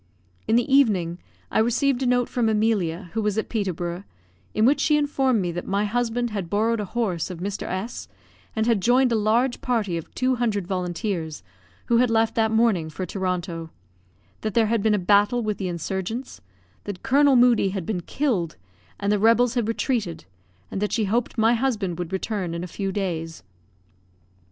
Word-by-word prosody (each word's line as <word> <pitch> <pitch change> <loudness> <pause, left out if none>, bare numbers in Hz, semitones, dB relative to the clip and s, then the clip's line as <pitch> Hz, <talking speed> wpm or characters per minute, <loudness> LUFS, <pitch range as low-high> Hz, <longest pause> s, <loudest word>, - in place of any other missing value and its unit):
In 225 - +3
the 240 - +3
evening, 185 -11 +3 0.3
I - - +2
received 245 +4 +2
a 260 - +1
note 245 -1 +2
from 235 -3 0
Emilia, 200 -5 0
who 225 - 0
was 210 -1 -1
at 220 - -1
Peterborough, 180 -4 -3 0.5
in 215 - +2
which 275 +4 +4
she 300 -1 +3
informed 270 -5 +1
me 175 - -1
that 175 +1 -5
my 200 +2 +1
husband 240 +2 -1
had 195 -5 -4
borrowed 225 +3 +1
a 210 - -2
horse 195 -6 -2
of 180 - -6
Mr. 195 +3 -4
S, 195 +6 -4 0.5
and 220 -1 +1
had 230 -4 +2
joined 250 +3 +4
a - - +3
large 230 +4 +1
party 215 -8 0
of 165 - -8
two 255 0 +1
hundred 215 -6 0
volunteers, 175 - -3 0.4
who 235 - +3
had 245 0 +3
left 225 0 +2
that 220 -1 +2
morning 220 -8 +2
for 185 +4 -5
Toronto; 180 -3 -3 0.7
that 215 -2 -3
there 230 -1 +4
had 225 0 +1
been 215 0 +3
a - - +1
battle 205 +5 +3
with 215 -1 -2
the 190 - -2
insurgents; 190 - -4 0.4
that 200 -3 -6
Colonel 280 0 +4
Moodie 240 -5 +5
had 190 -3 -4
been 185 -3 -2
killed, 200 - -1 0.4
and 200 0 0
the 210 - +2
rebels 230 +3 +4
had 240 -4 0
retreated; 225 - -2 0.5
and 195 - -3
that 210 - 0
she 220 -2 +1
hoped 235 +5 -1
my 225 +1 +4
husband 220 -8 -1
would 175 0 -4
return 190 -3 -2
in 170 - -4
a - - -5
few 195 +2 -3
days. 165 - -3
215 Hz, 190 wpm, -24 LUFS, 185-235 Hz, 0.7 s, Moodie